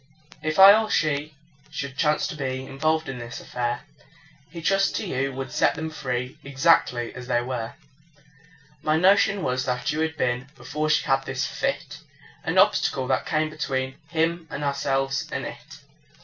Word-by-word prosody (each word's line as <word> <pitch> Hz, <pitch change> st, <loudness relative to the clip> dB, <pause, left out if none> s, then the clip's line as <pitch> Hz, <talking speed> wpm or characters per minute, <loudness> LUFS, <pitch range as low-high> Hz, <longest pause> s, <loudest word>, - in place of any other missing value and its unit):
If 155 Hz, 0 st, -2 dB
I 195 Hz, +1 st, +10 dB
or 220 Hz, -, -4 dB
she 150 Hz, 0 st, 0 dB, 0.3 s
should 140 Hz, -1 st, -5 dB
chance 150 Hz, +1 st, +2 dB
to 175 Hz, -, -4 dB
be 130 Hz, -2 st, -3 dB
Involved 155 Hz, +4 st, 0 dB
in 135 Hz, -2 st, -5 dB
this 120 Hz, 0 st, -7 dB
affair, 120 Hz, -1 st, -3 dB, 0.7 s
He 170 Hz, +2 st, -8 dB
trusts 195 Hz, +4 st, +2 dB
to -, -, -2 dB
you 135 Hz, -6 st, -1 dB
to 135 Hz, 0 st, -5 dB
set 150 Hz, -, +2 dB
them 160 Hz, 0 st, -4 dB
free, 125 Hz, -4 st, -4 dB
Exactly 135 Hz, -4 st, +2 dB
as 125 Hz, 0 st, -9 dB
we 120 Hz, -, +3 dB
were. 120 Hz, -2 st, -4 dB, 1.1 s
My 155 Hz, +1 st, +2 dB
notion 195 Hz, +2 st, +4 dB
was 130 Hz, 0 st, 0 dB
that 125 Hz, -1 st, -1 dB
you 150 Hz, -, -2 dB
had 160 Hz, 0 st, -1 dB
been 125 Hz, +1 st, -1 dB
(Before 155 Hz, 0 st, -3 dB
she 155 Hz, -, +3 dB
had 135 Hz, 0 st, +1 dB
this -, -, -1 dB
fit) -, -, -3 dB, 0.4 s
An -, -, -1 dB
obstacle 130 Hz, -1 st, +3 dB
that -, -, +1 dB
came 155 Hz, 0 st, 0 dB
between 130 Hz, -4 st, -2 dB
Him 165 Hz, 0 st, 0 dB
and 150 Hz, -, -5 dB
ourselves 140 Hz, -1 st, 0 dB
and -, -, -3 dB
it. -, -, -9 dB
140 Hz, 170 wpm, -25 LUFS, 130-160 Hz, 1.1 s, I